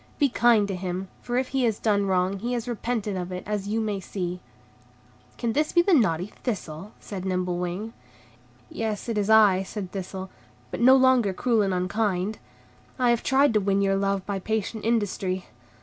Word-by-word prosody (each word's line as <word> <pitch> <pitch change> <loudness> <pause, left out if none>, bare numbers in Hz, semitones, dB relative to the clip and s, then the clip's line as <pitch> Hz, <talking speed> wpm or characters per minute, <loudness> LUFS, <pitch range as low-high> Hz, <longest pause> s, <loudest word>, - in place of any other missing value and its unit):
Be 285 -2 +3
kind 235 -4 +4
to 195 - -3
him, 185 +1 -4
for 245 0 -2
if 255 0 0
he 265 -1 0
has 220 -3 +1
done 205 -2 +1
wrong, 185 +1 +1
he 240 +4 -2
has 240 -1 -3
repented 230 -3 -2
of 180 0 -4
it, 180 0 -5
as 205 -1 -3
you 215 +2 0
may 210 -3 -1
see." 180 -1 -4 1.0
"Can 235 -2 -1
this 300 +3 0
be 345 - +5
naughty 210 - +2
Thistle?" 195 - -5
said 195 -3 -7
Nimble 180 -2 -1
Wing. 180 +6 -4 0.7
"Yes, 220 -1 -4
it 230 - -2
is 205 0 -1
I," 210 -4 +6
said 195 -1 -6
Thistle, 190 -1 -6 0.4
"but - - -4
no 260 +2 +8
longer 260 -6 +4
cruel 230 +2 +1
and 195 -1 +1
unkind. 185 +2 -1 0.6
I 250 -2 +3
have 235 - +1
tried 270 -1 +3
to 215 - +4
win 200 0 +1
your 195 0 +2
love 195 -1 0
by 200 -1 -2
patient 220 +1 -3
industry. 200 -5 -1
205 Hz, 185 wpm, -25 LUFS, 190-230 Hz, 1.0 s, no